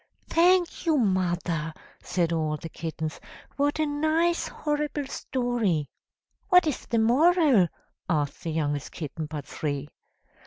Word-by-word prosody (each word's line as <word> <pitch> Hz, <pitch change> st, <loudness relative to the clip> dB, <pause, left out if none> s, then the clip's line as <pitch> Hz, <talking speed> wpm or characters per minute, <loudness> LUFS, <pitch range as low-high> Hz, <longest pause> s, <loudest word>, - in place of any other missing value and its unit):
"Thank 355 Hz, +1 st, +3 dB
you, 315 Hz, -2 st, +4 dB
mother," 175 Hz, -, 0 dB, 0.3 s
said 170 Hz, -2 st, 0 dB
all 155 Hz, -2 st, 0 dB
the 165 Hz, -, -8 dB
kittens; 160 Hz, -1 st, -5 dB, 0.4 s
"what 285 Hz, +1 st, +1 dB
a 310 Hz, -, +2 dB
nice 315 Hz, +4 st, +1 dB
horrible 295 Hz, -1 st, -2 dB
story." 240 Hz, -, -1 dB, 0.6 s
"What 360 Hz, -3 st, +7 dB
is 300 Hz, -5 st, -2 dB
the 235 Hz, -, 0 dB
moral?" 265 Hz, -, +5 dB, 0.4 s
asked 150 Hz, -4 st, 0 dB
the 165 Hz, -, -2 dB
youngest 145 Hz, -2 st, -2 dB
kitten 155 Hz, -1 st, -5 dB
but 150 Hz, -2 st, -6 dB
three. 145 Hz, -1 st, -4 dB
200 Hz, 125 wpm, -27 LUFS, -, 0.6 s, What